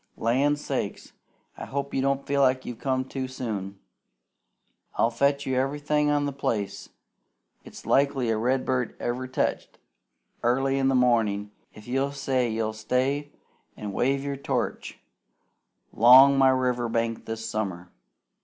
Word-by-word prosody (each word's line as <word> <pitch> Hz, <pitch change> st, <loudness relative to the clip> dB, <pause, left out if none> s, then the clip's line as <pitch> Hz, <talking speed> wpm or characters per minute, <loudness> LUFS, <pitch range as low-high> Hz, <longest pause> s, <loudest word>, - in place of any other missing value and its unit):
Land's 140 Hz, +6 st, +1 dB
sake! -, -, -2 dB, 0.6 s
I -, -, -7 dB
hope 140 Hz, 0 st, -4 dB
you 135 Hz, -, 0 dB
don't 140 Hz, 0 st, 0 dB
feel 140 Hz, -2 st, +3 dB
you've 120 Hz, -2 st, -7 dB
come 130 Hz, -1 st, -1 dB
too 130 Hz, 0 st, -4 dB
soon. 105 Hz, -7 st, -5 dB, 1.2 s
I'll 115 Hz, -, +2 dB
fetch 140 Hz, +4 st, +1 dB
you 130 Hz, -, -1 dB
everything 145 Hz, +3 st, 0 dB
on 145 Hz, -1 st, +1 dB
the 140 Hz, -, -3 dB
place 110 Hz, -7 st, -3 dB, 0.7 s
it's -, -, -12 dB
likely 135 Hz, -4 st, +2 dB
a 110 Hz, -, 0 dB
redbird 130 Hz, +1 st, 0 dB
ever 125 Hz, +2 st, -3 dB
teched, 130 Hz, -, -2 dB, 0.7 s
airly 135 Hz, +3 st, +1 dB
in 135 Hz, -, +2 dB
the 135 Hz, -, +2 dB
mornin' 110 Hz, -5 st, +2 dB, 0.2 s
if 105 Hz, +1 st, -13 dB
you'll 135 Hz, +3 st, -1 dB
say 135 Hz, -3 st, 0 dB
you'll 110 Hz, 0 st, -2 dB
stay 130 Hz, +6 st, -1 dB, 0.5 s
an' 105 Hz, -1 st, -5 dB
wave 135 Hz, +6 st, 0 dB
your 140 Hz, -1 st, -3 dB
torch 140 Hz, -, -3 dB, 1.0 s
'long 130 Hz, +4 st, +8 dB
my 135 Hz, -1 st, +5 dB
river 125 Hz, -2 st, 0 dB
bank 115 Hz, 0 st, -2 dB
this 110 Hz, 0 st, -5 dB
summer. 95 Hz, -5 st, -4 dB
130 Hz, 140 wpm, -26 LUFS, 115-140 Hz, 1.2 s, long